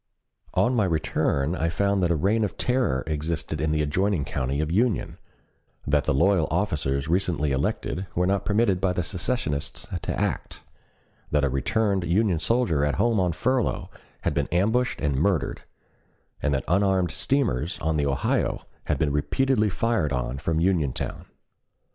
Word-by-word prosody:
On 125 - +3
my 110 -5 +2
return 80 -3 0
I 85 -2 0
found 100 +3 +1
that 90 - +2
a 85 - +2
reign 100 +8 +2
of 105 - -3
terror 125 - +1
existed 80 +1 -3
in 80 0 +1
the 75 -1 +1
adjoining 90 +1 0
county 65 +2 -2
of 80 +1 -1
Union; 110 +3 0 0.7
that 75 0 +2
the - - +1
loyal 90 +2 +3
officers 75 -7 -1
recently 85 -4 +1
elected 75 +7 -2
were 90 - +2
not 100 +1 +1
permitted 105 -3 +2
by 95 -1 +2
the 90 - -1
secessionists 85 - -2 0.2
to - - -3
act; - - -3 0.7
that 75 -1 +1
a 70 - +2
returned 100 - 0
Union 90 +1 +2
soldier 85 - +1
at 75 -2 +1
home 115 - +2
on 90 -2 +2
furlough 130 +8 -1 0.3
had - - 0
been 70 - 0
ambushed 110 +8 +1
and 70 -3 0
murdered; 80 -2 0 0.8
and 75 - +1
that 65 -2 0
unarmed 95 -1 +2
steamers 95 - 0
on 80 0 -1
the 75 -1 +1
Ohio 70 -1 0 0.2
had 75 - 0
been 75 0 +1
repeatedly 110 - +1
fired 105 -7 0
on 65 0 -2
from 80 +1 0
Uniontown. 85 -7 -1
85 Hz, 160 wpm, -25 LUFS, 75-100 Hz, 0.8 s, On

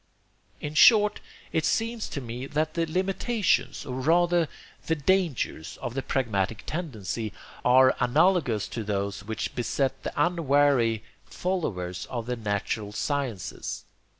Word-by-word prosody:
"In 150 - -5
short, 210 +5 +6 0.3
it 160 - +1
seems 225 +3 0
to - - -4
me 125 +2 -6
that 155 +2 -1
the 165 -1 0
limitations, 190 +5 0
or 130 -1 -4
rather 170 +2 +3 0.4
the 165 - +2
dangers, 150 - 0
of 120 -3 -4
the 135 - -2
pragmatic 110 -6 -1
tendency, 115 - -4 0.3
are 130 +1 +6
analogous 140 - +3
to 115 - -4
those 100 -1 -2
which 110 +1 -4
beset 135 +2 -1
the - - -4
unwary 140 -9 +3 0.2
followers 100 - -3
of 120 -3 -4
the 125 +1 -2
'natural 105 -1 -2
sciences.' 130 -4 -3
135 Hz, 125 wpm, -27 LUFS, 110-170 Hz, 0.4 s, short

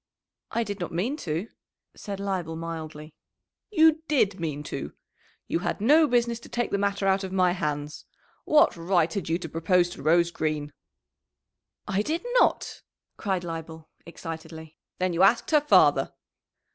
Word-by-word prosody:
"I 235 - 0
did 205 -2 -5
not 175 - -4
mean 205 - -1
to," 170 - -3 0.5
said 200 -1 -6
Leibel 185 -5 -3
mildly. 160 -2 -7 0.6
"You 320 -5 +4
did 205 -10 +2
mean 150 -3 -3
to. - - -6 0.5
You - - 0
had 190 - -2
no 300 +9 +5
business 235 -2 +1
to - - -14
take 240 -1 -2
the 200 - 0
matter 200 0 0
out 195 0 +2
of 190 - -5
my 185 -1 +3
hands. 150 -4 -3 0.4
What 305 +2 +4
right 170 -1 +1
had 195 -5 -3
you 165 - +2
to 175 - -7
propose 175 +3 +2
to 140 - -9
Rose 170 +3 +3
Green?" 150 -3 -3 1.1
"I 200 0 +1
did 320 - -3
not," - - +1 0.4
cried 190 -3 -2
Leibel 160 -1 -7
excitedly. 160 -1 -9 0.2
"Then 185 -1 0
you 170 - 0
asked 215 +9 +4
her 300 -1 +5
father!" 295 - +4
180 Hz, 160 wpm, -26 LUFS, 160-205 Hz, 1.1 s, no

